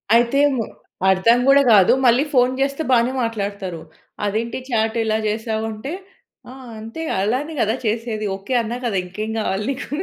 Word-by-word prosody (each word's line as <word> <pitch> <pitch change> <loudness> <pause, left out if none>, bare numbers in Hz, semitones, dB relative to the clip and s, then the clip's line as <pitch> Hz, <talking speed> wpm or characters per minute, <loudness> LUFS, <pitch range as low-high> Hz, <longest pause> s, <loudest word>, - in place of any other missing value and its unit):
అయితే 240 +4 +3 0.2
మ్ - - -2 0.5
అర్థం 190 +6 +4
గూడా 275 +1 +7
గాదు. 195 -4 +6
మళ్ళీ 245 +3 +5
ఫోను 250 -1 +4
జేస్తే 275 +3 0
బానే 240 0 +3
మాట్లాడతారు. 200 -6 -4 0.4
అదేంటి 225 +5 -2
చాట్ 220 -2 0
ఇలా 220 -1 +1
జేశావు? 220 +1 -2
అంటే, 220 +7 -6 0.6
"ఆ! - - -9 0.3
అంతే. 225 +8 -8
గ - - -1
అలానే 265 +9 -1
గదా! 220 +2 +1
చేసేది. 220 -1 -2
ఓకె, 195 +7 -6
అన్నా 230 +2 -4
కదా!" 220 -5 0
ఇంకేం 210 +5 -5
గావాలి 210 -1 -2
నీకు. 265 - -6
225 Hz, 160 wpm, -20 LUFS, 210-245 Hz, 0.6 s, గూడా